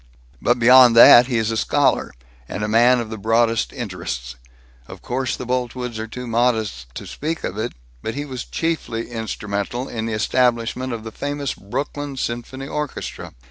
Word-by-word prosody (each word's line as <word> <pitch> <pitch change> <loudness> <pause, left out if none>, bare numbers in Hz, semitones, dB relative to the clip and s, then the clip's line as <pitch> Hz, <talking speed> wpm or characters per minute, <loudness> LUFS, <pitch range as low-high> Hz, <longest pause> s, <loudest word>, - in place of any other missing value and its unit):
But 120 - +2
beyond 125 0 +7
that, 120 +1 +9
he 125 -3 0
is 110 0 0
a 110 - -1
scholar, - - +1 0.4
and 105 - -4
a - - 0
man 120 +3 +5
of 115 -2 -5
the 110 - -6
broadest 115 +2 +2
interests. 85 - -5 0.5
Of - - -11
course 130 +1 -2
the 125 - -6
Boltwoods 125 -1 -3
are 110 - -4
too 125 +3 -7
modest 110 - 0
to - - -7
speak 160 +2 -4
of - - -3
it, 115 +2 -3 0.3
but 110 - -4
he 145 +1 -3
was 130 -3 -6
chiefly 140 -9 -3
instrumental 110 +2 -3
in 110 -1 -4
the 115 - -3
establishment 120 +2 0
of 115 -2 -5
the 110 - -7
famous 145 +2 -3
Brooklyn 140 +6 -5
Symphony 130 +2 -4
Orchestra. 150 -1 -5
120 Hz, 175 wpm, -21 LUFS, 110-130 Hz, 0.5 s, that